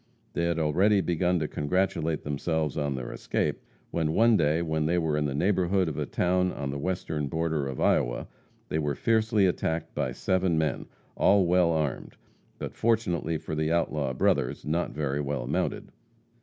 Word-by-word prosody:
They 85 - 0
had 85 -1 0
already 90 +7 +3
begun 90 0 +1
to 80 -2 -1
congratulate 80 0 -1
themselves 75 0 -1
on 70 -2 -1
their 65 -2 -5
escape, - - -2 0.3
when 80 -2 0
one 115 +3 +5
day 80 -1 +2
when 80 -1 0
they 85 +2 +1
were 80 -3 +1
in 75 0 0
the 70 -2 -2
neighborhood 95 +2 +2
of 75 - -3
a - - -2
town 90 0 +1
on 70 -1 -4
the 70 - -4
western 80 -3 -2
border 80 -2 -1
of 65 -2 -5
Iowa, - - +1 0.4
they 80 - 0
were 75 -2 -1
fiercely 110 -3 +2
attacked 80 -2 -1
by - - -1
seven 95 -3 0
men, 80 -2 -1 0.3
all 100 -1 +4
well 90 0 +3
armed, 75 -5 -2 0.4
but, - - -6
fortunately 90 -8 0
for 80 0 -7
the 80 +1 0
outlaw 75 -5 0
brothers, 60 -1 0
not 80 +3 0
very 75 -1 -2
well 70 -3 -3
mounted. - - -2
80 Hz, 175 wpm, -27 LUFS, 75-90 Hz, 0.4 s, one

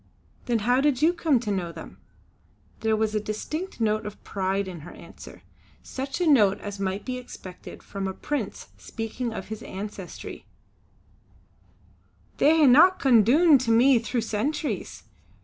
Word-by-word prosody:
"Then 240 -2 +2
how 250 +2 +3
did 290 -1 +1
you 335 +2 +5
come 320 -7 +2
to 215 -4 -3
know 180 -4 -2
them?" - - -11 0.8
There 220 -1 +1
was 215 0 0
a 215 - +1
distinct 305 - -5
note 215 -1 +1
of 210 - -10
pride 195 0 -2
in 180 -3 -7
her 160 +4 -11
answer. - - -13 0.4
Such 270 +3 -5
a 355 - +1
note 215 -11 +4
as 205 -1 -7
might 195 +1 -3
be 255 -1 -3
expected 185 -7 -11
from 195 -1 -5
a 190 - -3
prince 275 -9 -4
speaking 230 +2 -5
of 200 -3 -7
his 220 -1 -6
ancestry: 195 -1 -8 1.9
"They 315 0 +5
hae 285 +8 +8
come 245 -5 +5
doon 290 - +5
to 245 -2 -3
me 240 +2 +5
through 235 +1 -2
centuries. 255 +8 -3
225 Hz, 155 wpm, -25 LUFS, 205-270 Hz, 1.9 s, hae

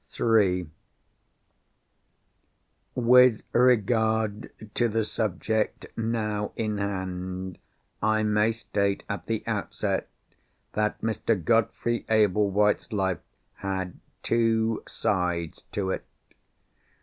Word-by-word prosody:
III 95 -6 +3 2.3
With 125 -1 +6
regard 110 -2 +2 0.2
to 120 - +2
the 110 0 0
subject 110 0 -1
now 110 -2 -1
in 105 -2 -2
hand, 95 -2 -4 0.4
I 110 0 +2
may 105 +1 +3
state, 100 -3 -1
at - - -5
the - - -1
outset, - - -2 0.6
that 105 0 0
Mr. 115 0 0
Godfrey 115 +4 +1
Ablewhite's 105 -1 +3
life 95 -4 0 0.4
had 95 -2 -4 0.2
two 115 -1 +2
sides 90 -4 -1
to 95 -2 -1
it. - - -3
105 Hz, 90 wpm, -27 LUFS, 95-115 Hz, 2.3 s, With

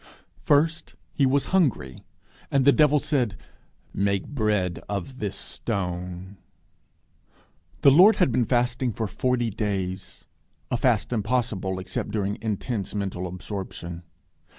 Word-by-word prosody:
First, 160 +3 +1 0.2
He 140 -4 +3
was 140 +6 0
hungry, 135 - +1 0.5
and 135 -2 +2
the 140 - +8
devil 150 0 +4
said, 125 -9 0 0.6
Make 100 -1 0
bread 105 - 0
of 105 +6 -4
this 105 -3 -3
stone. 90 +1 -4 1.4
The 140 - +7
Lord 185 +10 +7
had 180 -9 +2
been 120 +1 +2
fasting 125 0 +1
for 110 - -2
forty 120 +2 0
days 95 -3 -4 0.5
a - - +2
fast 125 -3 +1
impossible 110 -4 -1
except 95 +2 -4
during 105 -1 -2
intense 110 -1 -3
mental 95 -3 -3
absorption. 90 -2 -6
110 Hz, 120 wpm, -25 LUFS, 95-130 Hz, 1.4 s, the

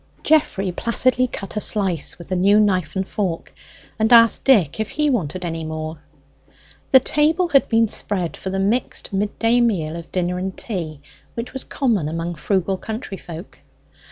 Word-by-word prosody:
Geoffrey 215 -11 +2
placidly 250 +5 +1
cut 200 -4 -7
a - - 0
slice 190 -8 0
with 170 - -12
the 185 - 0
new 200 +3 +4
knife 185 -7 +1
and 190 0 -1
fork, 185 -6 -3 0.5
and 220 +2 +2
asked 230 -1 +6
Dick 210 - +3
if 220 - -2
he 300 -1 0
wanted 180 - -2
any 165 -1 -3
more. 155 0 -5 0.9
The 265 - +8
table 315 +6 +1
had 275 -4 +3
been 225 -1 +3
spread 185 -4 -2
for 190 - -6
the 190 - -2
mixed 210 +2 -1
midday 225 +4 +1
meal 170 -9 0
of 170 0 -9
dinner 180 0 -1
and 190 0 -4
tea, 165 - -5 0.3
which 235 +2 -5
was 265 - -4
common 215 - 0
among 165 +2 -3
frugal 190 +3 -1
countryfolk. 195 -6 -7
195 Hz, 165 wpm, -21 LUFS, 175-230 Hz, 0.9 s, The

